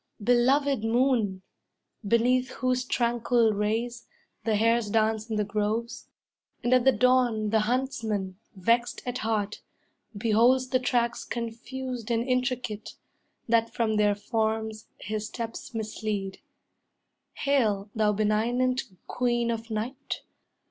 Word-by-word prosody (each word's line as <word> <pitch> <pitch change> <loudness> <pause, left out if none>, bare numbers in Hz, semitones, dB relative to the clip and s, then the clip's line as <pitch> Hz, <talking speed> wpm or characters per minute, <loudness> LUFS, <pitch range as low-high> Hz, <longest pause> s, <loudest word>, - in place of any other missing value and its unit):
Belovèd 245 +3 +3
moon, 225 -5 +1 0.6
beneath 250 +4 +3
whose 255 0 0
tranquil 235 -2 +2
rays 225 +4 -2 0.4
The 220 -2 +2
hares 230 0 +2
dance 220 +1 +1
in 220 - -1
the 210 - +1
groves, 215 +3 -2 0.6
and 240 - +2
at 255 -1 +4
the 265 - +7
dawn 245 -3 +2
The 220 - +4
huntsman, 215 -5 -1 0.2
vexed 235 +6 +1
at 250 0 -3
heart, 215 -2 -1 0.6
beholds 235 +4 +3
the 255 - +2
tracks 240 -1 0
Confused 240 +1 -5
and 235 +1 0
intricate, 250 -4 -2 0.5
that 230 0 +3
from 220 -2 0
their 205 -1 +3
forms 220 0 -2
His 215 0 -3
steps 230 0 -6
mislead; 215 -3 -3 0.9
hail, 215 -8 +1
thou 215 -2 +2
benignant 235 +5 +1 0.2
Queen 240 -1 0
Of 230 0 -4
Night! 240 +6 -4
230 Hz, 115 wpm, -27 LUFS, 215-250 Hz, 0.9 s, the